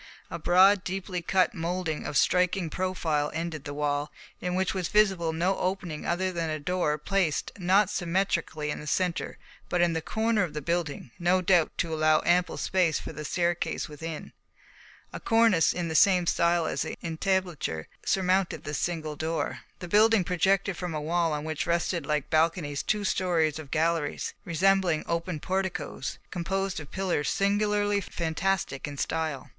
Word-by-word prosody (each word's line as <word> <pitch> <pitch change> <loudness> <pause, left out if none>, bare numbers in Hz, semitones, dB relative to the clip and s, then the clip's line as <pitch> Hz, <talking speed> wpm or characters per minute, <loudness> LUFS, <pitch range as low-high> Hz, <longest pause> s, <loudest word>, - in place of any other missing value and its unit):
A 170 - -4
broad, 185 +4 +5
deeply 185 -1 -3
cut 190 +6 +2
moulding 170 -3 -3
of 145 - -1
striking 180 -2 +2
profile 165 -5 -1
ended 160 -3 -4
the 145 - -5
wall, 145 0 -1 0.3
in 180 0 -2
which 190 0 0
was 185 -3 -2
visible 190 -5 +3
no 175 +4 0
opening 180 -4 -3
other 185 +3 0
than 170 -2 -2
a 155 - -1
door 165 -1 0
placed, 175 0 0
not 190 +3 +4
symmetrically 175 -5 -1
in - - -4
the 150 - -9
centre, 180 +2 -1 0.3
but 180 - 0
in 175 -1 +3
the 160 - -1
corner 220 +4 0
of 165 -5 -2
the - - -1
building, 165 -6 -2
no 180 +2 +3
doubt 180 -3 +3
to 165 -2 -1
allow 155 0 +3
ample 175 +1 +2
space 180 -4 +1
for - - -7
the 150 0 -6
staircase 170 +3 -1
within. 155 +1 -7 0.8
A - - -5
cornice 225 -8 +4
in 175 -1 -3
the 160 - -3
same 180 +1 +5
style 170 0 +2
as - - -2
the - - -4
entablature 170 - -1 0.2
surmounted 190 -1 +1
this 150 - -3
single 155 -3 -2
door. 160 +2 -2 0.2
The 180 - -7
building 215 +2 +5
projected 190 +1 +1
from 180 -3 -4
a - - -1
wall 165 +2 0
on 150 -1 -2
which 155 -1 -3
rested 170 0 0
like 150 -1 -1
balconies 155 -3 +1
two 210 -1 -1
stories 170 -6 +1
of 150 -3 -9
galleries, 160 -1 0
resembling 185 -2 +2
open 170 -1 -2
porticoes, 185 -6 -3
composed 190 +2 -2
of 145 -3 -10
pillars 185 -6 -1
singularly 205 0 +1
fantastic 170 -4 -2
in 145 -1 -7
style. 160 -2 -2
175 Hz, 165 wpm, -27 LUFS, 155-190 Hz, 0.8 s, broad